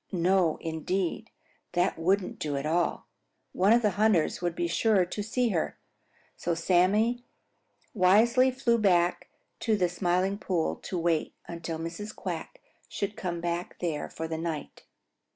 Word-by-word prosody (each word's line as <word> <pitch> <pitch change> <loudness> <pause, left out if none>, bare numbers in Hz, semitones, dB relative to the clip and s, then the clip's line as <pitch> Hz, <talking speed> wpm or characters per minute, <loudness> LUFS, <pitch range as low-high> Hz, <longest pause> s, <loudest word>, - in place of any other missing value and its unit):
No, 180 -2 +2
indeed, 175 +6 -2 0.4
that 175 -1 +1
wouldn't 185 +3 0
do 145 -2 -2
at 140 - -3
all. 170 +2 0 0.5
One 195 +3 +3
of 235 +1 +5
the 210 - +3
hunters 205 -9 +3
would 175 -1 -1
be 175 - -1
sure 195 +2 +3
to 205 - -5
see 235 +3 0
her. 175 -6 -1 0.6
So 170 -1 -2
Sammy 200 +8 +2 0.7
wisely 230 +7 +5
flew 235 -2 +1
back 180 -4 +2 0.3
to 220 -3 +1
the 180 -2 +2
Smiling 180 +2 0
Pool 180 -5 -1
to 185 - -5
wait 165 -2 0
until 165 -1 -5
Mrs. 165 +6 -6
Quack - - -6 0.3
should 200 +1 -3
come 175 -2 -4
back 175 +1 -3
there 160 -4 -3
for 160 - -5
the 160 0 -4
night. 165 -3 -5
180 Hz, 150 wpm, -28 LUFS, 170-205 Hz, 0.7 s, of